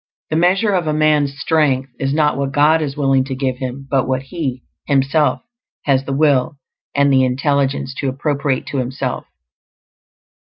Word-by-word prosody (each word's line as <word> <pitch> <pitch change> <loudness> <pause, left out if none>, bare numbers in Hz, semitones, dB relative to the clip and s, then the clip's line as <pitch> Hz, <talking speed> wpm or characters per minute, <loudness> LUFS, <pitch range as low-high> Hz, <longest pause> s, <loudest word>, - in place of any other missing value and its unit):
The - - +1
measure 185 +6 +3
of 180 -4 0
a 155 - +1
man's 150 -2 +2
strength 140 -4 +1
is 135 0 -1
not 150 0 +2
what 140 -1 -2
God 150 +3 +3
is 145 -2 -4
willing 135 -2 +2
to 135 -1 -4
give 130 -1 -2
him, 130 +1 -5
but 135 -1 0
what 130 0 -1
he, 135 -4 -4 0.2
himself, 145 +5 +1 0.4
has 135 -1 +1
the 140 - -4
will 140 -1 +2 0.4
and 140 -1 +3
the 130 -1 +4
intelligence 135 +1 0
to 140 - -1
appropriate 140 0 -1
to 140 - -2
himself. 130 +2 -3
140 Hz, 165 wpm, -18 LUFS, 135-150 Hz, 0.4 s, the